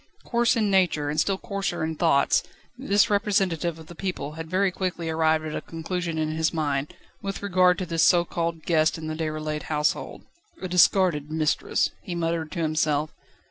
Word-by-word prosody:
Coarse 235 Hz, 0 st, +2 dB
in 215 Hz, -3 st, +1 dB
nature, 170 Hz, -6 st, +2 dB
and 155 Hz, -, -1 dB
still 195 Hz, +3 st, +1 dB
coarser 200 Hz, -3 st, -3 dB
in 160 Hz, 0 st, -1 dB
thoughts, 150 Hz, -4 st, +3 dB, 0.3 s
this 210 Hz, -6 st, +2 dB
representative 190 Hz, -6 st, +1 dB
of 160 Hz, -, -12 dB
the 175 Hz, -, -11 dB
people 175 Hz, -5 st, -4 dB
had 160 Hz, +1 st, -8 dB
very 190 Hz, +1 st, +2 dB
quickly 175 Hz, -3 st, -3 dB
arrived 160 Hz, 0 st, +2 dB
at 155 Hz, -, -4 dB
a -, -, -3 dB
conclusion 165 Hz, 0 st, -4 dB
in 155 Hz, 0 st, -1 dB
his 160 Hz, 0 st, 0 dB
mind, 145 Hz, -3 st, -2 dB, 0.3 s
with 195 Hz, 0 st, -5 dB
regard 185 Hz, -2 st, +3 dB
to 185 Hz, -, -3 dB
this 165 Hz, -1 st, -1 dB
so 175 Hz, -1 st, +5 dB
called 165 Hz, -1 st, -3 dB
guest 160 Hz, -1 st, +2 dB
in 160 Hz, -, -7 dB
the 155 Hz, -, -3 dB
Déroulède 155 Hz, -1 st, -3 dB
household. 150 Hz, -1 st, -1 dB, 0.4 s
"A 185 Hz, -, -4 dB
discarded 180 Hz, -4 st, +3 dB
mistress," 155 Hz, -1 st, 0 dB
he 175 Hz, -, -6 dB
muttered 165 Hz, -2 st, -2 dB
to 170 Hz, -3 st, -2 dB
himself. 155 Hz, -1 st, 0 dB
165 Hz, 180 wpm, -25 LUFS, 155-185 Hz, 0.4 s, so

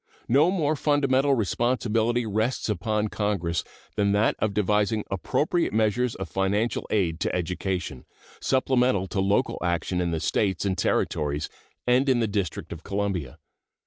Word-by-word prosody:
No 145 Hz, +8 st, +4 dB
more 155 Hz, -5 st, +1 dB
fundamental 140 Hz, -2 st, +2 dB
responsibility 120 Hz, +1 st, +1 dB
rests 110 Hz, +4 st, -1 dB
upon 105 Hz, 0 st, 0 dB
Congress 90 Hz, -8 st, -1 dB, 0.3 s
than 100 Hz, -1 st, +2 dB
that 105 Hz, +2 st, +2 dB
of 110 Hz, -, +1 dB
devising 105 Hz, +1 st, +1 dB
appropriate 150 Hz, -, 0 dB
measures 110 Hz, +3 st, +1 dB
of 95 Hz, -, -5 dB
financial 100 Hz, +4 st, 0 dB
aid 85 Hz, -6 st, 0 dB
to -, -, -1 dB
education, 90 Hz, -5 st, -3 dB, 0.3 s
supplemental 130 Hz, -6 st, +2 dB
to 100 Hz, -, -2 dB
local 100 Hz, +7 st, +1 dB
action 90 Hz, +1 st, -1 dB
in 85 Hz, -, 0 dB
the 80 Hz, -1 st, -1 dB
States 95 Hz, +2 st, 0 dB
and 95 Hz, -2 st, +1 dB
Territories 75 Hz, -3 st, 0 dB, 0.4 s
and 125 Hz, +3 st, +3 dB
in 130 Hz, -2 st, +3 dB
the 115 Hz, -, +1 dB
District 100 Hz, -4 st, -3 dB
of 85 Hz, 0 st, -10 dB
Columbia. 100 Hz, -9 st, -2 dB
105 Hz, 145 wpm, -26 LUFS, 95-125 Hz, 0.4 s, No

